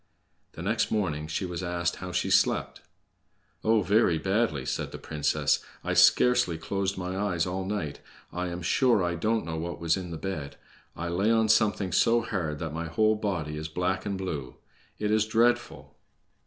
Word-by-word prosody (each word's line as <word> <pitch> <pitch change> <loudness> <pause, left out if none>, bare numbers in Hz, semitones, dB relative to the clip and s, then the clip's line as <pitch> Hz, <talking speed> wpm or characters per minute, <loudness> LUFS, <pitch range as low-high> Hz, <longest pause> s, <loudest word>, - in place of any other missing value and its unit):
The 80 - -8
next 110 +5 +1
morning 80 -8 -1
she 80 +4 -2
was 90 -1 -4
asked 85 -1 -1
how 90 0 -6
she - - -1
had - - +3
slept. - - +2 0.8
"Oh, 110 -1 +3
very 100 -2 +3
badly!" 95 - 0
said - - -3
the - - -7
princess. 75 -1 0 0.2
"I - - -1
scarcely 125 -9 +5
closed 95 +4 -2
my 90 0 -4
eyes 95 -4 0
all 95 +1 -3
night! 95 -8 -3 0.3
I 90 +1 -2
am 90 0 -5
sure 120 +2 +3
I 85 0 0
don't 110 +4 0
know 80 -1 -4
what 85 +2 -4
was 85 +1 +1
in 90 -2 -6
the 85 - -5
bed. 80 -6 -5 0.4
I 85 - -4
lay 95 +5 +1
on 110 -1 +3
something 105 -3 +2
so 115 +7 +4
hard 85 -10 -3
that 80 0 -5
my 85 +1 -3
whole 110 +6 +2
body 90 -8 -3
is 80 +1 -4
black 90 +4 -1
and 100 -2 -3
blue. 75 -9 -5 0.4
It 105 0 -1
is 110 0 +2
dreadful!" 120 +2 +1
90 Hz, 185 wpm, -28 LUFS, 80-105 Hz, 0.8 s, scarcely